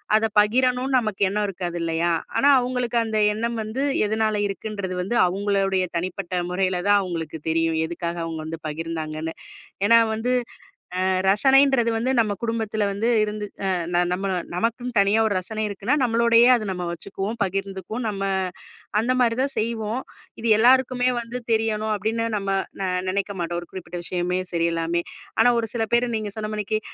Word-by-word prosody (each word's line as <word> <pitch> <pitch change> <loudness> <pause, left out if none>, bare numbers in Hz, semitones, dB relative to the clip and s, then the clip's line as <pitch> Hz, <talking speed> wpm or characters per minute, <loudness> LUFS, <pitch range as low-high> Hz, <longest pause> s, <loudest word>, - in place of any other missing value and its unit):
அத 220 0 +3
பகிரணும்னு 250 +4 +2
நமக்கு 215 -4 -4
எண்ணம் 210 +1 0
இருக்காது 175 -3 -4
இல்லயா! 165 +1 0 0.3
ஆனா, 280 +5 +5
அவுங்களுக்கு 245 -1 -1
அந்த 220 -1 -2 0.2
எண்ணம் 230 +2 -2
வந்து 220 +5 -4 0.3
எதனால 220 0 +1
இருக்குன்றது 200 -1 -5
வந்து 200 +7 -2
அவுங்களுடைய 195 0 +1
தனிப்பட்ட 185 +1 -3 0.2
முறையில 185 0 0
தான் 205 0 +6
அவுங்களுக்கு 165 -4 -4
தெரியும். 165 0 +1
எதுக்காக 170 +1 -4
அவுங்க 165 -1 -4
வந்து 160 +1 -5
பகிர்ந்தாங்கன்னு. 160 0 -4 0.5
ஏன்னா 230 +2 +7 0.2
வந்து 235 +3 -1 0.7
அ - - +2 0.2
ரசனைன்றது 265 +2 +4
வந்து 245 +4 0
நம்ம 210 -2 0
குடும்பத்துல 220 -2 -1
வந்து 215 +4 -1 0.2
இருந்து 210 0 -3 0.2
அ - - +1 0.3
ந - - +4 0.2
நம்ம 190 +2 -3 0.3
நமக்குத் 235 +4 -2
தனியா 200 +2 +4
ஒரு 205 - 0
ரசனை 215 +4 -4
இருக்குன்னா 205 +7 0
நம்மளோடயே 235 0 +5
அத 215 -3 -5
நம்ம 180 -1 -4
வச்சுக்குவோம். 200 +6 -5
பகிர்ந்துக்குவோம். 195 +4 -4
நம்ம 195 -1 -4 0.8
அந்தமாரி 245 0 +2
தான் 275 - -3
செய்வோம். 225 +1 -2 0.4
இது 230 - -2
எல்லாருக்குமே 255 +1 +4
வந்து 235 +2 -6
தெரியணும் 220 -1 +1
அப்பிடின்னு 220 +3 -1
நம்ம 195 -1 -3 0.3
ந 195 - -2 0.3
நினைக்கமாட்டோம். 185 -3 -2
ஒரு 175 - -11
குறிப்பிட்ட 180 -1 -7
விஷயமே 180 +1 -1
சரி 170 -1 +1
எல்லாமே! 165 +1 0 0.4
ஆனா, 245 - +6
ஒரு 225 - -2
சில 230 -2 0
பேர் 235 0 +2
நீங்கச் 215 0 -4
சொன்னமானிக்கி 215 0 -2
210 Hz, 155 wpm, -23 LUFS, 185-230 Hz, 0.8 s, ஏன்னா